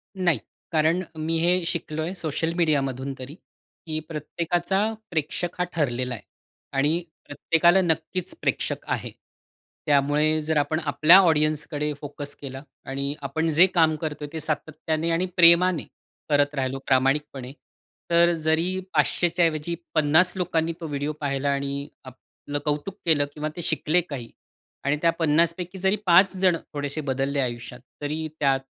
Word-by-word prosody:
नाही. 175 -8 +1 0.3
कारण 160 +3 +2
मी 160 +1 -1
हे 175 +2 +2
शिकलोय 160 0 -3
सोशल 165 -2 -2
मीडियामधून 140 -5 0
तरी, 135 +5 -8 0.5
की 155 -1 -2
प्रत्येकाचा 175 +6 -1 0.2
प्रेक्षक 165 +2 -2
हा - - +3
ठरलेला 125 -5 -1
आहे. 115 - -8 0.5
आणि 155 +5 +2 0.2
प्रत्येकाला 170 +5 +3
नक्कीच 175 - -1
प्रेक्षक - - -2
आहे. - - -2 0.7
त्यामुळे 150 +2 +2
जर 155 0 -1
आपण 145 +2 +1
आपल्या 155 +5 +7
ऑडियन्सकडे 150 -3 +1
फोकस 145 0 -7
केला 135 -1 -7 0.2
आणि 140 +1 -3
आपण 160 +4 -1
जे 170 +5 +7
काम 165 -4 +3
करतोय 150 -2 -4
ते 160 - -3
सातत्याने 155 +1 -2
आणि 170 +2 +1
प्रेमाने 170 0 +6 0.5
करत 145 0 +2
राहिलो, 135 -1 -2
प्रामाणिकपणे. 135 0 +1 0.6
तर 170 0 +4
जरी 165 +3 0
500 175 - +2
च्या 170 0 +2
ऐवजी 160 +1 -1 0.2
50 160 +4 +4
लोकांनी 165 -2 0
तो 165 - -5
व्हिडिओ 145 +1 -3
पाहिला 140 -1 -1
आणि 140 0 -3 0.2
आपलं 135 +3 -8
कौतुक 150 +6 -2
केलं 155 -4 +3
किंवा 155 0 -3
ते 175 - -5
शिकले 160 +1 +1
काही 140 -8 -7 0.6
आणि 145 +2 +2
त्या 165 0 +4
50 165 +1 +3
पैकी 180 +1 -6
जरी, 190 +2 +2
5 185 +2 +5
जण 185 -2 +3 0.2
थोडेसे 145 +1 -3
बदलले 135 0 -1
आयुष्यात, 120 -1 -3 0.2
तरी 155 +2 -2
त्यात 135 -2 +3
155 Hz, 140 wpm, -25 LUFS, 145-170 Hz, 0.7 s, आपल्या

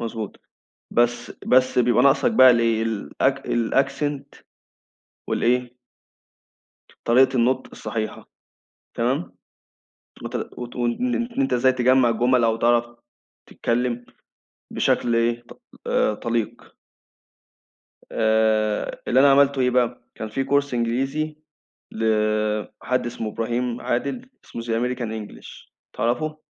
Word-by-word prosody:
مضبوط 115 -3 -5 0.6
بس 120 0 +1 0.2
بس 130 0 +4
بيبقى 125 0 +3
ناقصك 140 - +4
بقى 130 - +7
الإيه 115 -2 +2
الأك 115 +5 -1
الaccent 135 +4 -1 0.9
والإيه؟ 125 +1 0 1.3
طريقة 130 +3 +4
النُطق 130 +2 +1
الصحيحة 110 -2 -5 0.7
تمام؟ 130 +8 -1 0.9
وت - - -6 0.2
وت 120 -1 -7
وإن 125 - -1
إن 240 +2 -2
أنت 270 - 0
إزاي 130 +2 +4
تجمّع 130 0 +3
الجُمل 120 +2 +2
أو 115 -1 +2
تعرَف 120 +1 +2 0.6
تتكلّم 120 0 -2 0.7
بشكل 120 -1 +1
إيه 115 +1 +1
ط - - -16 0.2
آآ 105 - +1
طليق. 115 0 -4 1.4
آآ، 110 -1 +1
اللي 130 - +4
أنا 140 0 +6
عملته 140 0 +4
إيه 125 -1 +3
بقى 125 -1 0
كان 110 - -6
في 135 +5 -2
course 140 -2 +1
إنجليزي، 135 +6 -1 0.5
لحد 110 +2 -1
إسمه 115 -2 -4
إبراهيم 120 +2 -2
عادل 140 - -3
اسمه 115 - -7
The - - -11
American 120 0 -1
English 110 -2 -10 0.2
تعرفه؟ 155 +6 -1
120 Hz, 110 wpm, -23 LUFS, 115-130 Hz, 1.4 s, بقى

